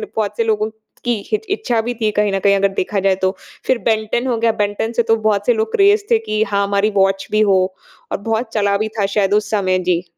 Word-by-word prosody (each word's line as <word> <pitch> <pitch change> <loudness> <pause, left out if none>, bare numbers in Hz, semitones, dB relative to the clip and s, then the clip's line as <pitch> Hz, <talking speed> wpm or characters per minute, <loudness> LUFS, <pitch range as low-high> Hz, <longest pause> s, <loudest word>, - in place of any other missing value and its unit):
बहुत 210 -2 -2
से 230 - +2
लोगों 215 0 0 0.4
की 240 - +1 0.2
हित 430 - +1
इच्छा 315 - 0
भी 240 +2 -3
थी 215 - +2
कहीं 210 -1 +1
न 195 - +1
कहीं 200 +1 +3
अगर 195 0 +3
देखा 195 +1 -1
जाए 190 0 +2
तो। 190 +1 +1 0.3
फिर 260 - +2
Ben 220 -1 +2
10 245 +2 0
हो 240 -3 0
गया, 230 0 +2
Ben 205 0 0
10 230 +1 -3
से 235 - +4
तो 225 0 +3
बहुत 210 -2 0
से 245 - +5
लोग 220 0 -2
क्रेज़ 405 +1 +4
थे 450 - +5
कि 215 0 +1
हाँ 200 -1 0
हमारी 200 +1 +1
वॉच 195 0 +2
भी 215 - +2
हो। 190 -1 +4 0.5
और - - -1
बहुत 225 +2 -2
चला 200 -2 +1
भी 215 +1 -1
था 200 - +2
शायद 200 0 +2
उस 210 0 +1
समय। 185 -3 +1
जी। 175 -1 +1
215 Hz, 260 wpm, -18 LUFS, 200-225 Hz, 0.5 s, से